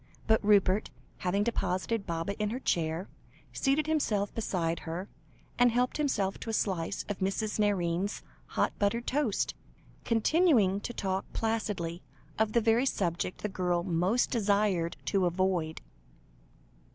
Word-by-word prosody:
But 220 -1 +3
Rupert, 205 -1 +4 0.3
having 190 +3 +1
deposited 200 -1 -1
Baba 170 +3 -2
in 210 - +1
her 240 +4 -3
chair, 165 -4 -1 0.5
seated 280 +2 +1
himself 220 -11 0
beside 170 -6 -1
her, 175 +4 -5 0.5
and 245 0 +6
helped 250 +2 +1
himself 215 -10 0
to - - -6
a - - -2
slice 190 -4 -1
of 205 - -4
Mrs. 210 +3 -1
Nairne's 195 -1 0 0.2
hot - - 0
buttered 230 +4 +1
toast, 265 -6 0 0.5
continuing 230 - +3
to 225 - -5
talk 190 -3 -2
placidly 205 -7 -2 0.4
of 220 -1 +2
the 235 - +4
very 230 +4 +3
subject 175 -5 -1
the - - +1
girl 180 -3 0
most 185 +6 +1
desired 200 -6 +1
to 190 -3 +2
avoid. 175 -3 0
200 Hz, 135 wpm, -30 LUFS, 180-225 Hz, 0.5 s, and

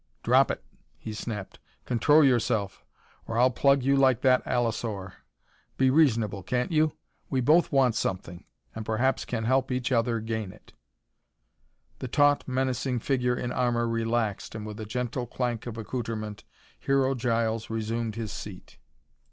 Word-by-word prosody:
"Drop - - +4
it," - - -4 0.3
he 110 - -7
snapped. 105 -2 -6 0.3
"Control 145 +6 +4
yourself, 110 -6 +1 0.4
or 115 - -3
I'll 125 +2 +5
plug 140 +2 +3
you 135 +1 +3
like 130 -3 +3
that 130 -2 +4
allosaur. 115 -6 -2 0.6
Be 130 -1 +4
reasonable, 115 -10 +2
can't 125 - -1
you? 155 -1 +2 0.4
We 130 - 0
both 155 +7 +4
want 135 -4 +3
something, 90 -4 -3 0.3
and 110 - -5
perhaps 120 +5 0
can 110 - -3
help 130 +3 +1
each 125 0 -1
other 115 -1 +1
gain 110 -3 -4
it." - - -19 1.3
The - - -4
taut, 145 +3 +3
menacing 130 -1 -1
figure 125 -2 +1
in 125 0 -3
armor 120 -2 +1
relaxed 115 -2 -1
and, 105 -1 -6
with 105 +1 -7
a 110 - -6
gentle 125 +2 -3
clank 120 -1 -3
of 115 -1 -6
accoutrement, 110 -2 -5 0.3
Hero 135 -1 +2
Giles 115 -2 -1
resumed 115 0 -2
his 115 -2 -4
seat. - - -9
120 Hz, 150 wpm, -27 LUFS, 110-130 Hz, 1.3 s, I'll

